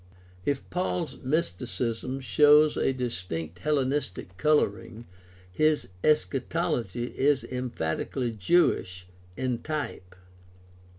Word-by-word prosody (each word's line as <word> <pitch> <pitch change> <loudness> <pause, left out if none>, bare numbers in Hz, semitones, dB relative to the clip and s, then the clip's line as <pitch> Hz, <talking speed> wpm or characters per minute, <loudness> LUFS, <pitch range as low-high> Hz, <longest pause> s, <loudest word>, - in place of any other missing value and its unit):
If 140 -1 -1
Paul's 180 -2 -2
mysticism 125 - -2
shows 150 +3 +5
a - - +2
distinct 90 - -4
Hellenistic 135 -10 -1
coloring, 115 -3 0 0.5
his 155 +6 +1
eschatology 150 - 0
is 140 0 +2
emphatically 125 - -2
Jewish 95 - +1 0.3
in 130 -2 -1
type. 145 -12 -5
130 Hz, 80 wpm, -27 LUFS, 110-150 Hz, 0.5 s, shows